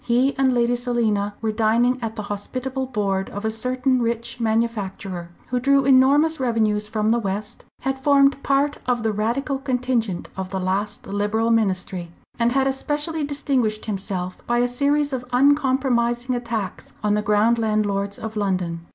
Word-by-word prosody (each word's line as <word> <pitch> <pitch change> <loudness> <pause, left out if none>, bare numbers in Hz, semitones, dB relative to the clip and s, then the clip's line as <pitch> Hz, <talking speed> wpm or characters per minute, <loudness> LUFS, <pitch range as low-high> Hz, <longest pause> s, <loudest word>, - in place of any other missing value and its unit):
He 250 +3 +2
and 265 -1 +3
Lady 240 0 +2
Selina 225 -4 0
were 220 -1 0
dining 230 +3 +2
at 225 -1 -4
the 215 - -4
hospitable 255 +6 -4
board 200 -5 -1
of 205 +2 -6
a 220 - +1
certain 255 +3 0
rich 235 +1 -2
manufacturer, 205 -6 -2 0.2
who 250 - 0
drew 275 +1 +3
enormous 275 +4 +4
revenues 220 -4 +1
from 215 0 0
the 235 - +3
west, 205 0 -4 0.2
had 270 0 -2
formed 275 0 +4
part 280 +1 +1
of 245 -2 +1
the 220 -1 +1
Radical 255 +7 -1
contingent 250 -7 -1
of 190 -1 -4
the 190 0 -3
last 190 +3 -2
Liberal 210 +3 0
ministry, 185 -5 0 0.3
and 235 +1 +2
had 270 0 +2
especially 295 +4 -1
distinguished 270 -7 -1
himself 190 -3 -4
by 240 - +1
a 245 0 +3
series 285 +3 +1
of 250 -2 -2
uncompromising 255 -3 +2
attacks 235 -4 -4
on 210 -1 +2
the 210 - +1
ground 210 +3 +3
landlords 205 -2 0
of 220 0 -6
London. 185 -5 -1
235 Hz, 160 wpm, -22 LUFS, 210-260 Hz, 0.3 s, enormous